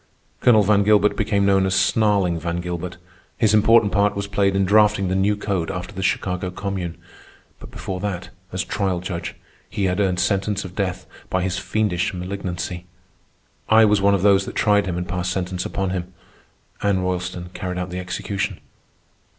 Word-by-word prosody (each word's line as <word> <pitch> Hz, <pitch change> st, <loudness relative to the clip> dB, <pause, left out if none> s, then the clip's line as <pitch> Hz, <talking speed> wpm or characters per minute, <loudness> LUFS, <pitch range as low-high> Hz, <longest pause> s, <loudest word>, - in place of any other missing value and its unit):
Colonel 110 Hz, -4 st, +5 dB
Van 100 Hz, 0 st, +4 dB
Gilbert 105 Hz, 0 st, +4 dB
became 100 Hz, -2 st, +1 dB
known 95 Hz, -1 st, +4 dB
as 95 Hz, -, 0 dB
"Snarling" 95 Hz, -3 st, +2 dB
Van 85 Hz, +1 st, -3 dB
Gilbert. 90 Hz, 0 st, -5 dB, 0.4 s
His 110 Hz, -3 st, +3 dB
important 105 Hz, 0 st, +5 dB
part 100 Hz, 0 st, +2 dB
was 100 Hz, 0 st, -2 dB
played 100 Hz, -1 st, +1 dB
in 95 Hz, 0 st, +2 dB
drafting 105 Hz, -1 st, +4 dB
the 95 Hz, -, 0 dB
new 100 Hz, +2 st, +2 dB
code 95 Hz, -5 st, -2 dB
after 90 Hz, +3 st, -5 dB
the 95 Hz, -, -5 dB
Chicago 90 Hz, -1 st, -1 dB
Commune. 95 Hz, -2 st, -4 dB, 0.6 s
But -, -, -11 dB
before 95 Hz, -1 st, -5 dB
that, 95 Hz, -2 st, -4 dB, 0.2 s
as 95 Hz, -, -2 dB
trial 95 Hz, -3 st, -1 dB
judge, 85 Hz, -1 st, -5 dB, 0.3 s
he 100 Hz, -, -3 dB
had 90 Hz, 0 st, +1 dB
earned 95 Hz, -3 st, +1 dB
sentence 100 Hz, +1 st, 0 dB
of 90 Hz, -, -9 dB
death 95 Hz, -2 st, -3 dB, 0.2 s
by 95 Hz, -1 st, 0 dB
his 95 Hz, 0 st, -1 dB
fiendish 105 Hz, -1 st, -1 dB
malignancy. 90 Hz, -1 st, -5 dB, 0.8 s
I 110 Hz, 0 st, +7 dB
was 105 Hz, -1 st, +3 dB
one 100 Hz, 0 st, +4 dB
of 95 Hz, -, -2 dB
those 100 Hz, -1 st, +4 dB
that -, -, -7 dB
tried 105 Hz, -1 st, +3 dB
him 90 Hz, -2 st, -2 dB
and 90 Hz, 0 st, -3 dB
passed 90 Hz, 0 st, -2 dB
sentence 90 Hz, -1 st, -2 dB
upon 95 Hz, -2 st, -2 dB
him. 90 Hz, -1 st, -4 dB, 0.7 s
Anna 100 Hz, -2 st, +1 dB
Roylston 90 Hz, -1 st, -3 dB
carried 90 Hz, -2 st, -4 dB
out 90 Hz, 0 st, -4 dB
the 90 Hz, -, -4 dB
execution. 90 Hz, +2 st, -3 dB
95 Hz, 180 wpm, -22 LUFS, 90-100 Hz, 0.8 s, I